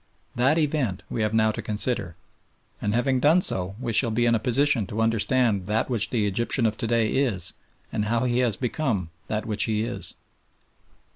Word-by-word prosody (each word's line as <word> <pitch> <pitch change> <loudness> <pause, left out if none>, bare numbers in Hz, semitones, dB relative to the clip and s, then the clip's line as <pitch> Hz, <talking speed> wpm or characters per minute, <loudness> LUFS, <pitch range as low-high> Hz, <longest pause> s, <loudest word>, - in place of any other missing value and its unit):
That 130 +6 +2
event 145 - -1
we 115 - -2
have 105 -1 0
now 110 0 +3
to 115 - -4
consider, 105 -4 -2 0.7
and 105 - -1
having 130 +2 +1
done 160 +7 +4
so 95 +1 -1
we 120 -3 -3
shall 115 +2 +3
be 120 +2 +1
in 120 - +3
a 115 - +2
position 125 -1 +1
to 105 - -5
understand 115 -2 +1
that 110 +4 -1
which 110 -3 +3
the 110 -4 0
Egyptian 115 +4 +2
of 110 -1 +1
to 115 - -3
day 115 -1 +1
is 105 -11 -1 0.4
and 105 -1 -1
how 115 +2 0
he 125 -1 +1
has 120 -5 +2
become 115 - -2 0.2
that 105 0 -3
which 110 +2 +2
he 110 -2 -1
is. 120 +1 -4
115 Hz, 195 wpm, -25 LUFS, 105-125 Hz, 0.7 s, done